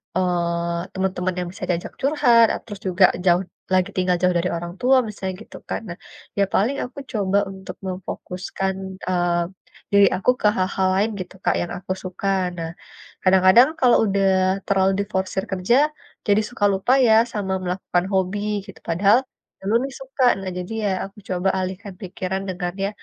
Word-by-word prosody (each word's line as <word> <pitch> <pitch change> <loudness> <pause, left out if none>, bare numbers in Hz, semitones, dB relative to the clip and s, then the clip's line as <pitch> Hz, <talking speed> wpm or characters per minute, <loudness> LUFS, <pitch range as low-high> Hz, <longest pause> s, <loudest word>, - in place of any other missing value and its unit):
eee, 170 -1 -1
teman-teman 185 -1 -1
yang 180 - -3
bisa - - -10
diajak 175 -1 -2
curhat, 265 -5 +5 0.2
terus 205 -3 -8
juga 185 +1 +2 0.2
jauh 175 0 +4 0.3
lagi 185 +1 +3
tinggal 180 -1 +2
jauh 180 -1 +3
dari 175 +1 0
orang 170 +1 -6
tua 260 +2 +4
misalnya 190 -3 -4
gitu - - -11
kan. - - -2
Nah, 175 - -6 0.4
ya - - +5
paling 230 +8 +2
aku 250 - -9
coba 200 -4 +1
untuk 190 0 -9
memfokuskan, 185 +1 -4 0.3
eee, 175 -1 +1 0.5
diri 200 0 +6
aku 195 - 0
ke - - +4
hal-hal 190 0 +1
lain 205 +3 +2
gitu 180 -1 -7
Kak, - - +2
yang 175 - -4
aku 185 - -7
suka. 185 +1 -5 0.3
Nah, 165 -1 -4 0.5
kadang-kadang 190 +7 +6
kalau 250 -2 +5
udah 195 -1 +1 0.4
terlalu 190 -1 +3
diforsir 190 -1 -2
kerja, 190 +5 +2 0.5
jadi 205 +1 +4
suka 245 -4 -1
lupa 195 +6 0 0.2
ya 220 - +6 0.2
sama 195 -3 -2
melakukan 180 0 -1
hobi 190 +1 +1 0.3
gitu, 200 - -12
padahal 200 +7 +4 0.4
dulu 200 +3 0
nih 275 - -4
suka. 265 0 -2 0.2
Nah 190 -1 -4
jadi 180 +3 -5
ya, 205 - +1 0.2
aku 195 +1 -14
coba 185 +1 +1
alihkan 190 +2 -4
pikiran 190 0 -4
dengan 180 -1 -3
ya, - - 0
190 Hz, 165 wpm, -22 LUFS, 180-200 Hz, 0.5 s, diri